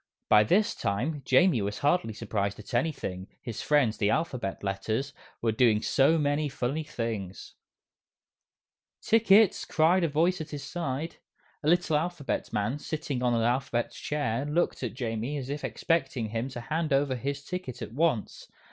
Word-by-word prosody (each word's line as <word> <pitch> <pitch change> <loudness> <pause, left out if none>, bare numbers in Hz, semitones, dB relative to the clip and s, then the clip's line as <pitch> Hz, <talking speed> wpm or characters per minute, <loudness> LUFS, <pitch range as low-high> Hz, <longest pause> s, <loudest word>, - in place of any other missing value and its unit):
By 105 0 +7
this 205 - +2
time, 135 +10 -2
Jamie 135 - +4
was 100 +1 -2
hardly 145 -5 +1
surprised 100 -2 -2
at 105 - -11
anything, 120 - -2
his 115 -3 -6
friends, 140 -7 +2
the 100 - +2
Alphabet 125 -12 -2
Letters, 110 +7 -2 0.3
were 115 - +3
doing 110 -2 +3
so 140 +5 +4
many 145 0 +1
funny 135 +4 -2
things. 115 -10 -5 1.5
"Tickets!" 220 -2 +4
cried 170 +4 +3
a - - +3
voice 165 +4 +1
at 155 - -6
his 145 -2 -6
side. 155 -1 -4 0.4
A 150 - +1
little 175 -2 +3
Alphabet 160 -2 -2
Man 105 +8 -1
sitting 150 -5 -3
on 120 -1 +2
an 115 - +1
Alphabet 120 0 0
Chair 140 -5 -2
looked 150 +4 0
at 125 -2 -4
Jamie 120 +2 -3
as 135 -1 -5
if 145 0 -4
expecting 135 -9 -1
him 115 +4 -2
to 125 -2 -7
hand 155 +5 -2
over 135 -1 +2
his 140 +3 -4
ticket 180 -9 -5
at - - -8
once. 150 -6 0
135 Hz, 160 wpm, -28 LUFS, 115-155 Hz, 1.5 s, By